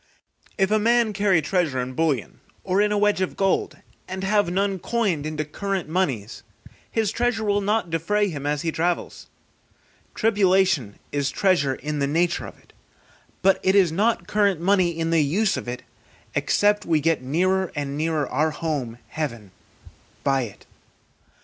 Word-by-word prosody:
If 195 0 +2
a 215 - +4
man 230 0 +3
carry 195 -5 +2
treasure 160 -5 0
in 125 +1 -3
bullion, 150 -2 -1 0.2
or 190 +2 +1
in 210 0 +2
a 210 - +1
wedge 205 -2 +2
of 185 - -2
gold, 195 -1 0 0.3
and 190 +1 -5
have 205 -1 +2
none 195 +1 0
coined 185 -7 -1
into 155 -1 -3
current 195 +3 -3
money, 155 - 0 0.6
his 220 -3 0
treasure 240 -2 0
will 205 -1 +1
not 205 -3 0
defray 205 +6 +1
him 145 -6 -5
as 150 +1 -1
he 165 - 0
travels. 170 +2 -2 0.9
Tribulation 190 - +2
is 140 -1 0
treasure 145 -9 +1
in 150 +1 -4
the 140 - +1
nature 170 +4 0
of - - -12
it, - - -25 0.7
but 195 0 +4
it 190 +1 +2
is 185 -5 +5
not 215 +7 +1
current 200 -4 +1
money 185 0 +3
in 165 -1 -2
the 165 -1 +4
use 190 +9 +1
of - - -6
it, 125 +1 -5 0.5
except 205 0 +2
we 160 -2 +2
get 165 0 +1
nearer 185 +7 0
and 140 -1 -3
nearer 155 -2 0
our 155 +6 +1
home, 150 -7 -3
heaven, 120 -11 -5 0.7
by 135 -1 +2
it. 110 -6 -8
175 Hz, 165 wpm, -23 LUFS, 150-200 Hz, 0.9 s, is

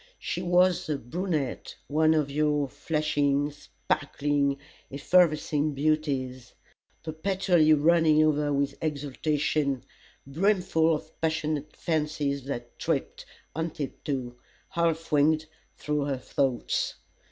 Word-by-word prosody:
She 175 - -4
was 180 0 +3
the 150 -2 -1
brunette 155 +2 -3
one 155 +2 +3
of 150 -3 0
your 150 -1 +1
flashing, 145 -1 0
sparkling, 145 -1 -1 0.3
effervescing 155 -1 +2
beauties, 135 -4 -1 0.5
perpetually 165 -1 +2
running 155 0 +4
over 150 -1 +2
with 140 0 -1
exultation 145 -2 -1 0.4
brimful 165 0 +2
of 155 +1 -10
passionate 155 -2 -1
fancies 150 -4 -1
that 120 -4 -6
tripped, - - -2 0.3
on 160 +1 -1
tiptoe, 135 -4 -5 0.3
half 165 -3 -1
winged, 155 +2 +3 0.3
through 150 -1 -1
her 140 -2 -1
thoughts. 130 0 -1
150 Hz, 100 wpm, -27 LUFS, 140-160 Hz, 0.5 s, running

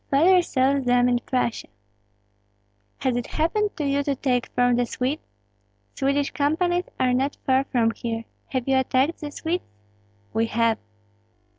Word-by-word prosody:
"Father 355 +6 +5
sells 275 -4 +1
them 245 0 +4
in 245 -1 +2
Prussia." 245 -2 -2 1.3
"Has 260 -3 +1
it 245 -1 -2
happened 405 +7 0
to 300 - -2
you 280 0 +1
to 285 -1 -1
take 250 -2 0
from 245 0 +2
the 245 0 +1
Swedes? 265 +7 -2 0.7
Swedish 280 +1 0
companies 350 +5 +1
are 255 -1 +2
not 270 +3 0
far 265 0 +3
from 235 -4 +1
here. 230 0 -4 0.2
Have 260 -2 -3
you 265 -1 +4
attacked 260 +4 +1
the 295 - -4
Swedes?" 340 +4 -2 0.7
"We 225 +1 +1
have." 230 0 +1
265 Hz, 150 wpm, -24 LUFS, 245-290 Hz, 1.3 s, Father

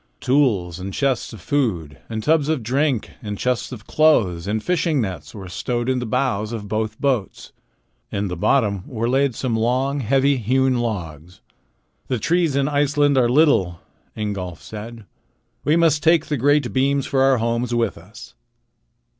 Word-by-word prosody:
Tools, 105 - +1
and 95 +1 -5
chests 135 -3 0
of 110 -6 -11
food, 90 - -1
and 110 -1 -4
tubs 155 +2 +2
of 155 -7 0
drink, 130 +1 0
and 105 -3 -5
chests 125 +3 -1
of 110 -5 -9
clothes, 100 - +2
and 110 +1 -1
fishing 165 -4 +1
nets 90 - -4
were 95 -3 -8
stowed 120 +7 -3
in 130 -1 +1
the 120 - -4
bows 115 -3 -1
of 110 -3 -5
both 110 +1 -3
boats. 125 -9 -2 0.6
In 100 0 -2
the 90 - -4
bottom 100 +1 +1
were 115 -2 -2
laid 135 0 +1
some 125 -1 -1
long, 130 +5 0
heavy, 135 +3 +2
hewn 130 +2 +1
logs. 90 -6 -5 0.7
"The 125 - -1
trees 165 - +1
in 140 -1 +1
Iceland 145 0 +2
are 125 -2 +3
little," 120 - +3 0.4
Ingolf 95 -5 -4
said. 110 +1 -9 0.6
"We 150 - +2
must 165 -3 +3
take 160 +1 +4
the 150 - -2
great 145 0 +2
beams 135 +1 +1
for 135 - 0
our 135 -1 +4
homes 115 +1 -1
with 115 -3 0
us." 95 +6 -13
120 Hz, 165 wpm, -21 LUFS, 105-140 Hz, 0.7 s, take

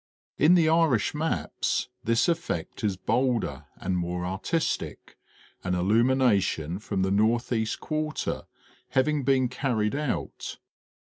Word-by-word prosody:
In 160 +5 +6
the 165 -3 +4
Irish 160 -9 +3
maps 160 +2 -1 0.2
this 115 0 +2
effect 165 - -2
is 100 -3 0
bolder 115 - 0
and 95 - -2
more 90 +1 -2
artistic, 100 - -2 0.5
an 90 0 0
illumination 100 - +2
from 100 -3 -2
the 95 - 0
northeast 110 +1 +1
quarter 155 -1 -2 0.4
having 145 +2 +2
been 130 -1 +3
carried 120 -4 -1
out. 145 -2 -3
115 Hz, 115 wpm, -27 LUFS, 95-145 Hz, 0.5 s, In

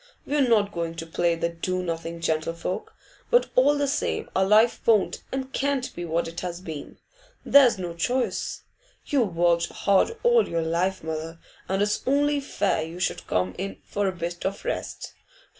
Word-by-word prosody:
We're 285 -2 +2
not 210 -3 +3
going 170 -3 -3
to 165 0 -5
play 170 +1 +1
the 170 0 -1
do 185 +2 -2
nothing 165 -1 -4
gentlefolk; 165 +3 -2 0.3
but 485 0 +3
all 285 +3 +5
the 285 0 +1
same 275 - -2
our 190 - +4
life 215 +4 +4
won't 215 -4 +3
and 265 0 -4
can't 275 -2 -1
be 175 - -4
what 165 +1 -1
it 165 +1 -6
has 175 -1 -4
been. 160 -6 -8 0.5
There's 270 -6 +6
no 175 -2 -4
choice. 245 +10 -1 0.4
You've 235 - 0
worked 170 0 +3
hard 200 - +2
all 480 -1 +4
your 165 -1 0
life, 175 +3 0
mother, 160 +1 -5 0.3
and 195 +1 +2
it's 210 0 0
only 290 +2 +3
fair 205 - 0
you 165 +3 -6
should 180 - -2
come 90 0 0
in 195 +1 -4
for 205 -1 -1
a - - +1
bit 175 -1 -5
of 195 +1 -3
rest. - - -4
185 Hz, 175 wpm, -25 LUFS, 170-250 Hz, 0.5 s, There's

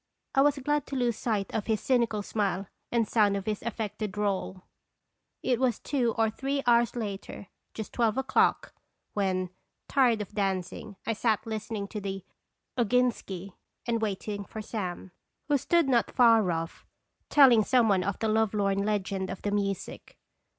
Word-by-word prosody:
I 270 - +4
was 290 0 +4
glad 295 +1 -1
to 275 - -5
lose 245 -3 +1
sight 210 -3 -2
of 215 - -2
his 220 -2 +1
cynical 235 -5 +1
smile 200 -2 -1 0.3
and 230 -2 +2
sound 205 -3 +3
of 195 - -5
his 210 -1 -2
affected 215 -2 -4
drawl. 195 -2 -2 0.8
It 245 -2 +1
was 255 -4 +2
two 245 -5 0
or 225 -1 +2
three 275 +4 -2
hours 235 -1 +4
later, 205 -3 -5 0.3
just 220 - -6
twelve 230 -1 +1
o'clock, 265 0 +2 0.4
when, 185 -3 0 0.4
tired 245 -5 +3
of 210 0 -6
dancing, 195 +1 -2
I 225 - 0
sat 220 -1 0
listening 220 -2 -4
to 210 - -5
the 195 -1 -5 0.3
" - - -54
Oginski," 225 -6 0 0.3
and 230 -1 0
waiting 205 -1 -3
for 220 - -8
Sam, 190 -4 -5 0.4
who 290 - +4
stood 340 +2 +2
not 245 -3 +2
far 230 -6 +5
off, 165 0 -4 0.5
telling 255 -7 +7
some 245 0 +3
one 195 -3 +3 0.2
the 220 - 0
love 220 -1 +2
lorn 200 -1 +1
legend 195 -2 -1
of 190 - -6
the 205 - -1
music. 200 -2 -3
215 Hz, 165 wpm, -28 LUFS, 200-240 Hz, 0.8 s, telling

